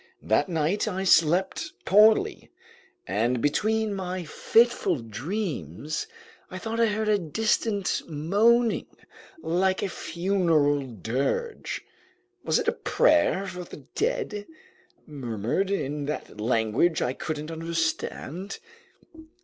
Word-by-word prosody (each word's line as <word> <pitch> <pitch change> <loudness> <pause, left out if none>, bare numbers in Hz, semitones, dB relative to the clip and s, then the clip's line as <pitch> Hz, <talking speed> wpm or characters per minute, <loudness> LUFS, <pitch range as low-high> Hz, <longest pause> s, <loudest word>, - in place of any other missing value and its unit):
That 110 +9 +2
night 170 +6 0
I 190 -2 -2
slept 185 - +3
poorly, 215 - +4 0.6
and 120 - 0
between 215 - +1
my 185 -2 -4
fitful 225 +2 +3
dreams, 145 - -4 0.4
I 185 - -6
thought 225 +4 -4
I 230 - +5
heard 215 0 -1
a 210 -1 +3
distant 205 +3 0
moaning, 210 +10 +2 0.6
like 185 +3 +1
a 200 - -1
funeral 170 -5 +1
dirge. 130 - -2 0.6
Was - - +2
it - - -2
a - - +5
prayer 300 -11 +2
for 180 -2 -6
the 150 -5 -12
dead, 435 - -2 0.6
murmured 130 - -2
in 145 -7 -2
that 145 -7 -5
language 115 +8 +2
I 125 - 0
couldn't 155 +2 -5
understand? 165 +2 -3
180 Hz, 110 wpm, -26 LUFS, 145-210 Hz, 0.6 s, I